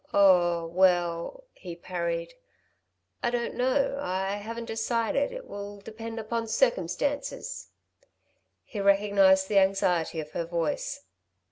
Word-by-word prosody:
"Oh, 175 -4 +5
well," 175 - +1
he 175 -3 -9
parried. 170 -1 -3 0.9
"I 240 - +1
don't 240 0 -2
know 275 +2 +1
...I 190 -1 -2
haven't 230 +3 -6
decided... 230 +4 0
it - - -8
will 205 0 -7
depend 225 +2 -7
upon 230 +1 -3
circumstances." 265 - -1 1.0
He 210 - -7
recognised 195 -1 +4
the 200 -1 +4
anxiety 180 -4 +1
of 155 -1 -6
her 170 - -3
voice. 175 - -2
200 Hz, 115 wpm, -28 LUFS, 180-230 Hz, 1.0 s, Oh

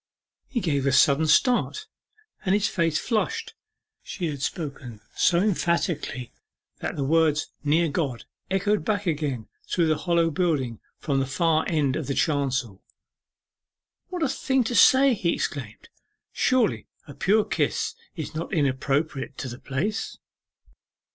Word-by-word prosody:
He 245 -3 -2
gave 140 -6 0
a - - +3
sudden 140 +4 +4
start, 250 - +2 0.6
and 190 0 +2
his 210 0 +2
face 165 -3 +1
flushed. 220 +4 -1 0.5
She 180 - -5
had 140 -2 -7
spoken 140 - -5 0.2
so 170 - +3
emphatically 170 - 0 0.5
that - - -4
the 140 - -2
words 155 +1 +2
'Near 160 +3 +3
God' 140 -6 -2 0.2
echoed 200 +2 +1
back 205 -2 -1
again 145 -9 -2 0.2
through 170 - +2
the 155 -1 +2
hollow 170 -2 +2
building 145 - 0 0.2
from 140 -2 -1
the 135 - -1
far 160 +3 +1
end 145 -5 +1
of 155 -4 -3
the 140 - -1
chancel. 130 - 0 1.3
'What 360 -3 -3
a - - +3
thing 265 -1 +1
to 235 +1 -3
say!' 265 +2 +6
he 180 -6 0
exclaimed; 120 -8 -5 0.4
'surely 255 -4 +1 0.2
a 145 - -9
pure 210 +8 +2
kiss - - -1 0.2
is 160 -5 -5
not 160 +2 -4
inappropriate 140 -2 -1
to 130 - -4
the 120 +1 -8
place! 175 +11 -3
160 Hz, 140 wpm, -25 LUFS, 140-190 Hz, 1.3 s, say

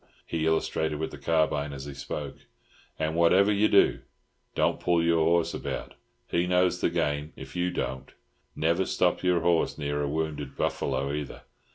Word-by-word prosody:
He 80 -1 -1
illustrated 80 -1 0
with 80 +1 -3
the - - -9
carbine 75 -3 +1
as 70 0 -7
he 70 - -7
spoke. 70 +1 -6 0.6
"And 80 0 -1
whatever 95 +5 +4
you 105 +2 +3
do, 100 - +4 0.6
don't - - +1
pull 85 -1 +2
your 85 -1 +3
horse 85 0 +2
about; - - -5 0.3
he 85 +1 0
knows 90 0 +2
the - - +2
game, 75 +1 -1
if 65 0 -10
you 90 0 0
don't. 65 -6 -4 0.4
Never 85 +4 +1
stop 90 - +1
your 90 -2 +2
horse 85 -1 +1
near 75 -1 -2
a 70 - 0
wounded 75 -3 -3
buffalo, 70 +1 -1
either. 75 -2 -5
80 Hz, 170 wpm, -27 LUFS, 75-85 Hz, 0.6 s, whatever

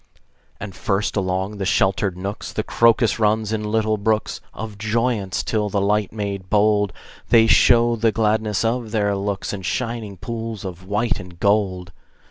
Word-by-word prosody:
And 105 -3 -7
first, 100 +3 -1
along 95 +1 -1
the 100 - -3
sheltered 95 0 +1
nooks, 100 +3 -5
The - - -2
crocus 115 -1 +3
runs 110 0 +1
in 110 -1 -2
little 110 -1 +1
brooks 110 0 -1
Of 110 -2 -8
joyance, 110 -3 -1
till 105 -2 -1
by 100 - -2
light 105 +1 +1
made 100 -3 -5
bold 105 -1 +3 0.4
They 115 -1 +6
show 120 +1 +5
the 115 0 +2
gladness 110 -1 0
of 115 0 -1
their 105 -2 0
looks 100 0 -3
In 100 - -5
shining 115 -1 -3
pools 115 +1 -5
of 95 0 -8
white 105 +3 0
and 90 -3 -11
gold. 95 -3 +1
105 Hz, 160 wpm, -21 LUFS, 100-110 Hz, 0.4 s, They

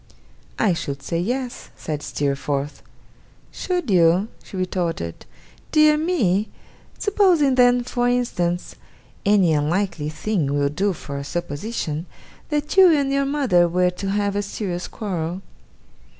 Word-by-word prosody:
'I 205 -5 +3
should 140 -4 -5
say 165 - -2
yes,' 245 +6 -3
said 150 -2 -4
Steerforth. 140 0 -2 0.7
'Should 355 - -2
you?' 180 +3 +4
she 190 - -9
retorted. 175 - -3 0.4
'Dear 305 -1 +5
me! 240 - +1 0.5
Supposing 370 -9 +3
then, 245 -1 +4
for 245 0 -1
instance 180 -8 -1 0.5
any 195 -5 +4
unlikely 155 +1 0
thing 155 -4 -1
will 140 0 +2
do 195 +7 0
for 140 -4 -6
a - - -5
supposition 165 +1 -4 0.4
that 295 +1 -2
you 375 -2 +8
and 280 -3 +2
your 275 0 +2
mother 265 -12 +3
were 180 +1 +2
to 195 +2 -5
have 200 0 0
a 205 - +1
serious 190 -3 -4
quarrel. 180 -3 -4
190 Hz, 130 wpm, -22 LUFS, 165-245 Hz, 0.7 s, you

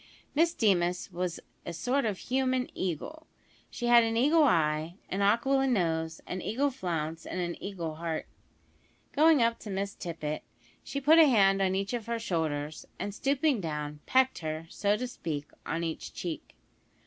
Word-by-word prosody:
Miss 330 +3 +4
Deemas 180 -3 +1
was 175 -1 -3 0.2
a 170 - -5
sort 255 - 0
of 210 -4 -1
human 255 +1 0
eagle. 190 - -4 0.4
She 240 - -5
had 240 -1 +7
an 225 0 0
eagle 300 +6 +5
eye, 160 - +2
an 195 - -1
aquiline 260 +6 +3
nose, 160 -4 0
an 185 - -4
eagle 270 +9 0
flounce, 165 -8 -3
and 185 - -5
an 175 -1 -2
eagle 175 -5 -4
heart. 165 -1 -3 0.9
Going 305 -3 +5
up 230 0 +1
to 215 - -9
Miss 200 +1 -2
Tippet, 155 -3 -4 0.4
she 280 - -4
put 305 +4 +6
a 320 - +9
hand 195 -5 +4
on 190 -1 +2
each 195 +3 -2
of 235 -3 -3
her 235 0 -1
shoulders, 155 -7 -2
and 205 - -4
stooping 275 +1 +1
down, 150 -2 -4
pecked 260 -3 +3
her, 155 0 -4
so 205 +3 +1
to 250 - -3
speak, 150 - -5 0.2
on 165 +1 -1
each 165 -1 -5
cheek. 170 -3 -5
195 Hz, 170 wpm, -29 LUFS, 165-250 Hz, 0.9 s, a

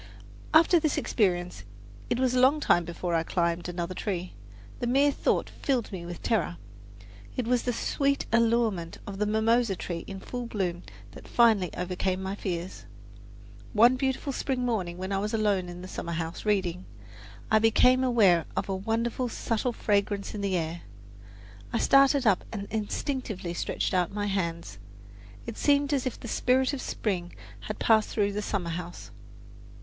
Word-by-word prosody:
After 330 +2 +6
this 310 -2 0
experience 175 - 0 0.5
it 240 - +1
was 255 -1 +1
a 255 - +2
long 270 +4 +5
time 175 - +3
before 170 +1 -4
I 165 - +3
climbed 170 +1 -1
another 175 +1 -3
tree. 185 -2 -3 0.5
The 240 - -2
mere 275 +4 +4
thought - - 0
filled 255 -5 -2
me 175 -3 -6
with 175 -1 -8
terror. 185 - 0 0.8
It 250 - 0
was 245 0 +2
the 250 - -1
sweet 280 +4 0
allurement 230 -7 +2
of 195 -1 -7
the 210 - +1
mimosa 220 0 +2
tree 170 -1 -5
in 195 -1 -6
full 245 +4 -5
bloom 180 -6 -2 0.3
that - - -12
finally 220 -7 +4
overcame 185 +1 -1
my 190 +1 -3
fears. 180 -2 -5 0.9
One 235 +3 +6
beautiful 265 +1 -1
spring 255 -1 -1
morning 185 -8 -1
when 190 +1 -5
I 195 - +1
was 210 +3 -1
alone 200 -4 +1
in 175 +1 -8
the - - -7
summer 170 -2 -5
house, 165 +3 -4
reading, 185 -3 0 0.7
I 220 - +6
became 250 +4 +4
aware 205 -10 +4
of - - -1
a 195 - 0
wonderful 230 +5 -1
subtle 230 +2 -1
fragrance 200 -2 0
in 210 - -4
the 195 -2 0
air. 165 0 -3 0.9
I - - 0
started 275 +1 +4
up 200 -4 +3
and 200 -3 -4
instinctively 215 -4 -3
stretched 175 - -2
out 180 -2 +1
my 205 0 -2
hands. 170 - -3 0.7
It - - -7
seemed 285 0 +3
as 270 -2 0
if 250 - -5
the - - -8
spirit 255 +4 +2
of 270 - -3
spring 180 -5 -3 0.2
had - - -6
passed 220 -1 +3
through 205 -2 0
the 210 - -2
summer 190 -5 -2
house. 170 - -7
205 Hz, 170 wpm, -28 LUFS, 180-245 Hz, 0.9 s, After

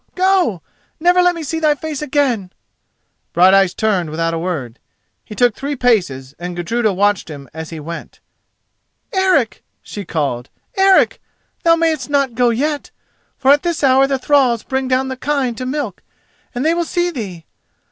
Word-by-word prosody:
—go! 365 - +2 0.4
Never 355 +2 +4
let 355 0 +3
me 335 - -5
see 325 +2 -3
thy 305 -2 +3
face 305 -1 -5
again!" 260 -10 0 0.8
Brighteyes 190 +1 +5
turned 195 -7 0
without 165 +2 -1
a 165 - -2
word. 150 -9 -4 0.4
He 210 - -10
took 245 0 +3
three 285 +5 -4
paces 175 - 0
and 175 0 -5
Gudruda 215 +6 0
watched 200 -1 +1
him 140 -3 -9
as 160 0 -7
he 165 - -7
went. 165 +3 -8 0.9
"Eric!" 370 - +1 0.2
she 205 - -7
called. 140 -8 -3 0.3
"Eric! 385 -1 +4 0.4
thou 330 0 +5
mayest 320 -5 0
not 280 -3 +1
go 245 +1 +2
yet: 290 +5 -1 0.5
for 270 - +4
at 290 0 +5
this 340 -4 -2
hour 270 0 +5
the 270 -1 0
thralls 260 -4 +2
bring 265 0 -2
down 260 +1 +1
the 260 - -3
kine 275 -2 -1
to 255 +3 -6
milk, 260 -8 -4 0.5
and 245 +4 -2
they 320 - +3
will 345 0 0
see 350 +1 -1
thee. 190 - -7
255 Hz, 165 wpm, -18 LUFS, 180-295 Hz, 0.9 s, Brighteyes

